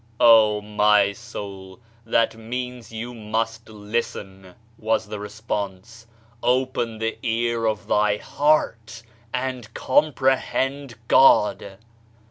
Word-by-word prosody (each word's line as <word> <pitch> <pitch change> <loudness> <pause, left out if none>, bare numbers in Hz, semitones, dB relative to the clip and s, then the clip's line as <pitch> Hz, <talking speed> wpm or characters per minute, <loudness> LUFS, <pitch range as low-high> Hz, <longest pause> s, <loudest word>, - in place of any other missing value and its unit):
"Oh, 110 -3 +6
my 105 -1 +3
soul, 100 -4 -9 0.3
that 115 0 +2
means 125 +1 -6
you 115 +2 -6
must 115 0 -3
listen 105 -3 -5
!" 115 0 -33
was 110 +1 0
the 105 - -7
response. 105 +1 -6 0.3
"Open 125 -2 0
the 115 +1 -3
ear 115 -1 0
of 110 -1 -2
thy 105 0 +2
heart, 115 -6 0 0.3
and 125 -3 -4
comprehend 135 -1 0
God 105 -6 +4
115 Hz, 100 wpm, -23 LUFS, 105-120 Hz, 0.3 s, Oh